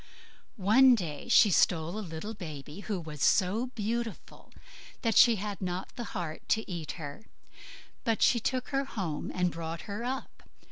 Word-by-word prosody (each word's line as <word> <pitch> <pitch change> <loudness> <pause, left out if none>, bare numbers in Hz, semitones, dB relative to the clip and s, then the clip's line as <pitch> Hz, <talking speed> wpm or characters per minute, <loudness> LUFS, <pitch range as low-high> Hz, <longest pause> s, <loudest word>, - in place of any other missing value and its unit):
One 245 +6 +6
day 165 -7 -5
she 220 -3 +6
stole 165 0 +2
a - - -3
little 180 +3 -6
baby, 155 -4 -8
who 205 -2 -3
was 155 -4 -8
so 205 +6 +3
beautiful 225 +1 -4 0.5
that 230 -2 +1
she 235 -2 +7
had 205 0 -5
not 180 0 -4
the 240 -3 -5
heart 165 -3 -4
to 220 - +1
eat 170 -5 -5
her; 155 +6 -8 0.8
but 225 -1 +1
she 235 - +5
took 255 +3 -2
her 275 -1 0
home 185 - -4
and 180 -1 0
brought 165 0 -5
her 205 +3 -5
up. 260 +2 -5
200 Hz, 160 wpm, -30 LUFS, 165-230 Hz, 0.8 s, she